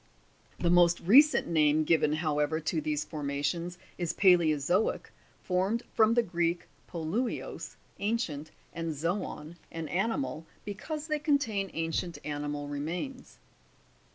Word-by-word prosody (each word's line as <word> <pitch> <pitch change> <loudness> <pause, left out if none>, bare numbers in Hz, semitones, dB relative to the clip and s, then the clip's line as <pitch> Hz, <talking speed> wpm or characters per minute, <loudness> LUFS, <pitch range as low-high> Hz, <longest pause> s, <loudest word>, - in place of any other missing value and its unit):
The 170 - +1
most 175 -1 +5
recent 280 - +6
name 155 -2 +3
given, 155 -1 +3
however, 155 -1 0
to 155 0 -1
these 150 0 -1
formations, 155 +4 -3 0.2
is 175 -2 -1
palaeozoic 175 -1 +3 0.3
(formed 195 +6 0
from 220 +1 +4
the 240 - +4
Greek 175 -3 -1 0.2
poluios, 175 +9 -3 0.2
ancient, 190 -9 -2 0.2
and 165 -1 -3
zbon, 165 0 -3
an 165 -1 -5
animal), 165 - -1 0.2
be 205 - -3
cause 300 +9 -5
they 305 -1 -1
contain 270 - +1
ancient 165 +1 -2
animal 145 -1 -3
remains. 170 - -5
170 Hz, 120 wpm, -30 LUFS, 155-200 Hz, 0.3 s, recent